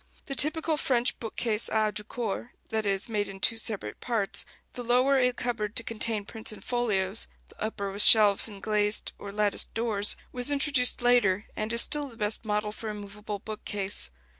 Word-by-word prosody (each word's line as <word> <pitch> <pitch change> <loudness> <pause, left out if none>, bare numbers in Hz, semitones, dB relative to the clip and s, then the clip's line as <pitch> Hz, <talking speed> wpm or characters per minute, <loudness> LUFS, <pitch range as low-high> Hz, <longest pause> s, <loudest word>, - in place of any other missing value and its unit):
The 275 - -5
typical 310 +3 +1
French 250 -3 0
bookcase 225 -1 -2
à 215 -1 +1
deux 210 - -5
corps 230 +1 -5 0.2
that 220 -1 -1
is, 195 0 0
made 210 -3 -1
in 195 0 -9
two 230 +4 +2
separate 200 - -3
parts, 220 -5 -2 0.3
the 245 - -6
lower 255 +3 +3
a 250 -1 +3
cupboard 230 -4 -4
to 230 - +1
contain 220 -2 -1
prints 220 +1 -7
and 215 - -11
folios, 215 -5 -1 0.2
the - - -19
upper 200 -2 -3
with 200 +2 -1
shelves 210 -2 +9
and 200 -2 -12
glazed 210 -1 +1
or 200 - -8
latticed 210 0 +1
doors 220 -3 +2 0.2
was 250 +2 -3
introduced 280 -4 +1
later, 220 -5 +3
and 215 +1 -3
is 235 0 +4
still 295 -1 0
the 235 -4 -14
best 215 +1 -1
model 210 0 -1
for 220 +1 -7
a 210 - -5
movable 205 0 -7
bookcase. 205 - -5
220 Hz, 190 wpm, -27 LUFS, 205-240 Hz, 0.3 s, shelves